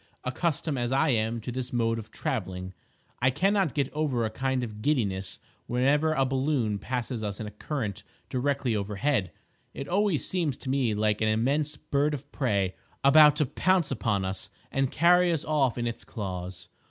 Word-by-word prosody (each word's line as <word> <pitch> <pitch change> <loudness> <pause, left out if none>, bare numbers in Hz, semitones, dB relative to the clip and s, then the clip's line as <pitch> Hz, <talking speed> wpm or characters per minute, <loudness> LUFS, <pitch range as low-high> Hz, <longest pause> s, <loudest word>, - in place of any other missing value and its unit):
Accustomed 145 +1 -1
as 120 0 -1
I 135 +4 +3
am 115 -1 +1
to 125 - -5
this 125 0 -4
mode 115 -1 +1
of 110 -1 -9
travelling, 95 -6 -3 0.5
I 130 - +5
cannot 185 +3 +1
get 140 -2 0
over 145 -6 0
a 110 - -2
kind 130 +2 -1
of 105 -3 -6
giddiness 100 -9 0 0.3
whenever 145 +6 +2
a 135 -3 +2
balloon 130 -5 0
passes 125 +1 -3
us 100 -1 -3
in 110 - -4
a 105 - -6
current 105 -1 -4 0.3
directly 130 -2 0
overhead. 105 +2 0 0.4
It 135 - -5
always 195 -3 +1
seems 165 -8 -1
to 130 - -4
me 130 -6 +1
like 105 0 +1
an 110 - +3
immense 140 +8 +1
bird 145 +1 0
of 145 +1 -10
prey 100 -9 0 0.3
about 150 +1 +8
to 150 0 +2
pounce 180 +3 +1
upon 100 -5 0
us 95 +1 -3 0.2
and 135 -1 +1
carry 175 +4 +4
us 160 -4 -1
off 140 -6 +1
in 120 - -1
its 115 -1 -4
claws. 90 -3 -6
130 Hz, 175 wpm, -28 LUFS, 110-145 Hz, 0.5 s, about